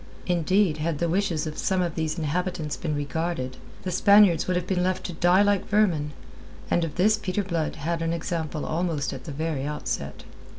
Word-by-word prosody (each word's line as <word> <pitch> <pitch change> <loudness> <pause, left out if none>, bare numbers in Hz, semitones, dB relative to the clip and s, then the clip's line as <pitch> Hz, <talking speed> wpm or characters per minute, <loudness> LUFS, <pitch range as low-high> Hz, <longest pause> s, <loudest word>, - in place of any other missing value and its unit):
Indeed, 180 0 +2
had 155 0 -1
the 170 - 0
wishes 170 -3 0
of 155 -1 -5
some 190 -1 +1
of 170 -2 -2
these 160 0 -2
inhabitants 165 0 -2
been 155 -3 -3
regarded, 145 -2 -3 0.3
the 185 - -2
Spaniards 200 -2 +5
would 185 - +1
have 180 - -2
been 180 -1 0
left 185 0 0
to 180 - -5
die 175 +4 +4
like 205 -1 +1
vermin, 180 -8 +2 0.6
and 175 - +3
of 160 -3 -4
this 210 +4 +4
Peter 200 0 -1
Blood 170 -5 -2
had 165 +3 -2
an 165 0 0
example 165 -2 -3
almost 160 -3 -1
at 130 -2 -8
the 155 - -5
very 155 -1 -2
outset. 150 +1 -4
170 Hz, 195 wpm, -26 LUFS, 155-185 Hz, 0.6 s, Spaniards